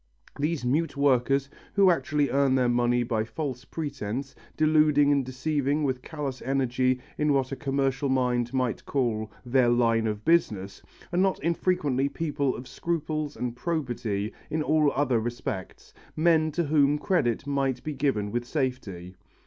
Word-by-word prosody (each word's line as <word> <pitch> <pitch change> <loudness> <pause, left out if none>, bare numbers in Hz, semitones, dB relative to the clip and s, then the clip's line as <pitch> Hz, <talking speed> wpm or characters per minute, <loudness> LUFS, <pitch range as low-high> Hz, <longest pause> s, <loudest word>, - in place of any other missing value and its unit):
These 150 -2 -1
mute 145 +4 0
workers, 135 0 +2 0.3
who 195 -2 +5
actually 150 -4 0
earn 135 -1 +3
their 130 -2 +3
money 120 0 +2
by 115 -2 0
false 125 +2 -5
pretences, 140 -4 -5 0.2
deluding 150 -2 +4
and 140 -1 +3
deceiving 140 +3 -1
with 130 -3 -1
callous 140 -4 -5
energy 130 -1 +1 0.2
in 150 -1 +3
what 135 -1 0
a - - -2
commercial 135 -1 -1
mind 125 -2 +1
might 130 -3 -1
call 110 -5 -1
"their 125 0 +3
line 115 -2 +2
of 105 0 -4
business," 100 - +1 0.3
are - - 0
not 190 0 +2
infrequently 150 -5 +1
people 145 -2 -1
of 125 - -8
scruples 155 -3 -3
and 120 -1 -3
probity 120 - -2 0.2
in 155 0 -1
all 150 -1 +3
other 130 -4 +2
respects, 110 -5 -5 0.2
men 155 -1 +3
to 170 - 0
whom 145 -1 +3
credit 145 - 0
might 135 -3 -1
be 155 - -3
given 130 -8 0
with 120 +2 -1
safety. 120 - -4
135 Hz, 150 wpm, -27 LUFS, 120-150 Hz, 0.3 s, who